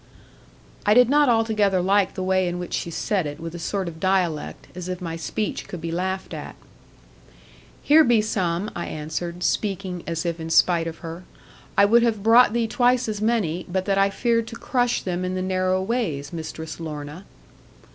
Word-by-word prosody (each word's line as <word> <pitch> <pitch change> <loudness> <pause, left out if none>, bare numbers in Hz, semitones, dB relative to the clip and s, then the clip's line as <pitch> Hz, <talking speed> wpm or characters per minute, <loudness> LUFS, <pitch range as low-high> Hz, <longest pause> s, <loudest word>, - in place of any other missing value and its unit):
I 210 +1 +4
did 250 -1 +6
not 290 -2 +5
altogether 215 -4 +2
like 195 +1 +2
the 185 - -3
way 185 0 +2
in 175 0 -2
which 180 0 -6
she - - -2
said 180 0 -1
it 145 +1 -7
with 165 0 -6
a 175 - -6
sort 190 +3 -2
of 160 -1 -7
dialect, 180 -4 -1
as 180 0 -6
if 180 -1 -3
my 165 -3 -4
speech 200 +6 -3
could 180 - -7
be 165 +1 -4
laughed 190 +2 -3
at. - - -7 1.3
'Here 315 +2 +6
be 240 -5 +4
some,' 195 -2 -1
I 170 - -4
answered, 170 +3 -5
speaking 190 -3 -1
as 165 0 -2
if 170 -1 -2
in 160 0 -5
spite 165 0 +3
of 165 0 -6
her. 165 +2 -7 0.5
'I 200 - +7
would 235 +4 +5
have 225 -4 0
brought 230 +1 +6
thee 235 0 0
twice 245 +1 +2
as 210 -1 -3
many, 205 -7 0
but 185 +1 -1
that 195 -1 +1
I 195 0 +4
feared 230 +2 0
to 230 - -8
crush 245 0 0
them 180 -1 -2
in 185 0 -2
the 185 - -2
narrow 185 0 +1
ways, 190 - -2
Mistress 160 -1 -6
Lorna.' 150 +2 -7
185 Hz, 195 wpm, -23 LUFS, 170-215 Hz, 1.3 s, I